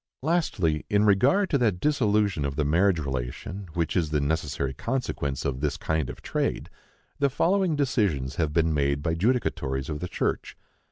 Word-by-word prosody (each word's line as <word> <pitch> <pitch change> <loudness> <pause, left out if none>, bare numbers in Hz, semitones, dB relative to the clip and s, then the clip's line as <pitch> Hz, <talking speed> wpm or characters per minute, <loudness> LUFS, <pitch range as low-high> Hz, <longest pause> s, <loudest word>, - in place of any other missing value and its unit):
Lastly, 110 - +1
in 105 0 +3
regard 135 - +3
to 140 - +3
that 105 -7 +1
dissolution 105 - +1
of 70 -1 -2
the 75 0 0
marriage 90 +5 +3
relation, 70 +7 -4
which 85 -2 -1
is 85 -5 +1
the 75 -1 +1
necessary 75 -2 -1
consequence 70 - -3
of 65 -2 -1
this 75 0 -1
kind 80 -5 -1
of - - -9
trade, - - -2 0.5
the 140 - +3
following 180 +4 +2
decisions 100 - 0
have 80 -3 0
been 80 0 +2
made 70 -1 0
by 80 - 0
judicatories 80 - 0
of 75 -1 -3
the 90 - -4
church. - - -2
85 Hz, 170 wpm, -26 LUFS, 70-115 Hz, 0.5 s, in